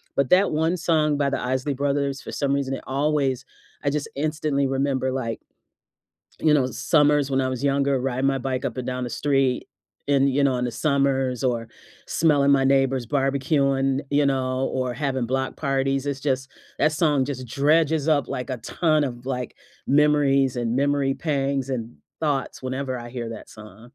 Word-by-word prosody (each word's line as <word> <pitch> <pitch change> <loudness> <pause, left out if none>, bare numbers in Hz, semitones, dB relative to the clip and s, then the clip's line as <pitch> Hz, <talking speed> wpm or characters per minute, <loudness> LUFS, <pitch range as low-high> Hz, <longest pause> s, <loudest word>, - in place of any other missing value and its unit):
But 140 -2 +1
that 190 +2 +5
one 160 +3 +1
song 155 -3 +2
by 140 -1 +1
The - - -1
Isley 130 +3 -1
Brothers, 140 0 -1
for - - -8
some 140 -1 -1
reason, 140 -1 -1
it - - -9
always 135 -2 0 0.4
I 140 - +2
just 150 0 -3
instantly 150 -2 0
remember, 135 -1 0
like 115 -4 -3 1.0
you 155 -1 +4
know, 140 -4 +3
s 130 - -5
summers 145 0 +3
when 135 0 +2
I 130 - 0
was 130 0 -4
younger, 140 -1 +1
riding 130 +1 -1
my 135 0 +1
bike 130 +1 -3
up 125 - -3
and 130 - -4
down 125 0 -3
the 120 - -5
street, 135 -2 0 0.4
in, 140 -1 +4
you 140 +1 +1
know, 135 -2 +2
in 125 - -1
the 120 - -1
summers, 135 -2 0
or 120 -3 -1 0.4
smelling 145 -3 +3
my 135 -1 +4
neighbors 135 -2 +2
barbecuing, 135 0 +1
you 145 0 +3
know, 130 -1 0
or 130 -1 -1
having 130 -3 -1
block 130 +2 -2
parties, 135 -1 0
it's 140 -1 -2
just 135 -1 -1 0.3
that 155 - +3
song 145 -4 +2
just 130 -2 -5
dredges 155 +3 +2
up, 145 -4 +2
like, 125 +1 -4
a 130 - -2
ton 155 +4 +1
of, 120 -2 -6
like, 125 -2 -3 0.3
memories, 140 -3 +3
and 120 -1 -1
memory 140 0 +1
pangs, 140 -3 -1
and 120 -3 -4 0.2
thoughts, 145 -4 -2
whenever 130 0 -3
I 120 0 -8
hear 120 -2 -5
that 110 - -9
song. 110 +2 -13
135 Hz, 185 wpm, -24 LUFS, 130-145 Hz, 1.0 s, that